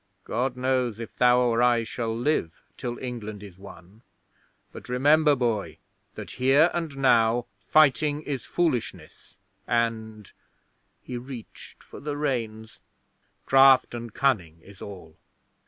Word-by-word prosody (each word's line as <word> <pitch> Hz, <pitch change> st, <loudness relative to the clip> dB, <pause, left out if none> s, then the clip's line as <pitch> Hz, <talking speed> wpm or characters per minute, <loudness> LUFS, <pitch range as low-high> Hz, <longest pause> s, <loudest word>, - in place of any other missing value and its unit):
God 125 Hz, +1 st, -2 dB
knows 125 Hz, -3 st, 0 dB
if 115 Hz, -, -8 dB
thou 125 Hz, 0 st, +4 dB
or 120 Hz, -1 st, +2 dB
I 120 Hz, -1 st, +3 dB
shall 115 Hz, 0 st, -4 dB
live 120 Hz, -, -1 dB
till 120 Hz, -1 st, -5 dB
England 110 Hz, -5 st, -7 dB
is 95 Hz, -3 st, -13 dB
won; 100 Hz, +1 st, -14 dB, 0.7 s
but -, -, -12 dB
remember, 145 Hz, +4 st, +4 dB
boy, 110 Hz, -, -2 dB, 0.4 s
that -, -, -8 dB
here 140 Hz, +6 st, +5 dB
and 165 Hz, -5 st, -4 dB
now 120 Hz, -3 st, +3 dB
fighting 145 Hz, +6 st, +2 dB
is 135 Hz, -6 st, -4 dB
foolishness 160 Hz, -10 st, -3 dB, 0.3 s
and" 110 Hz, -3 st, -2 dB, 0.7 s
he 125 Hz, -, -6 dB
reached 125 Hz, -2 st, -11 dB
for -, -, -12 dB
the 145 Hz, 0 st, -5 dB
reins 115 Hz, -6 st, -3 dB, 0.7 s
"craft 135 Hz, -1 st, +5 dB
and 120 Hz, -1 st, -6 dB
cunning 90 Hz, -12 st, 0 dB
is 100 Hz, -1 st, -16 dB
all." 90 Hz, -6 st, -10 dB
120 Hz, 125 wpm, -25 LUFS, 110-135 Hz, 0.7 s, here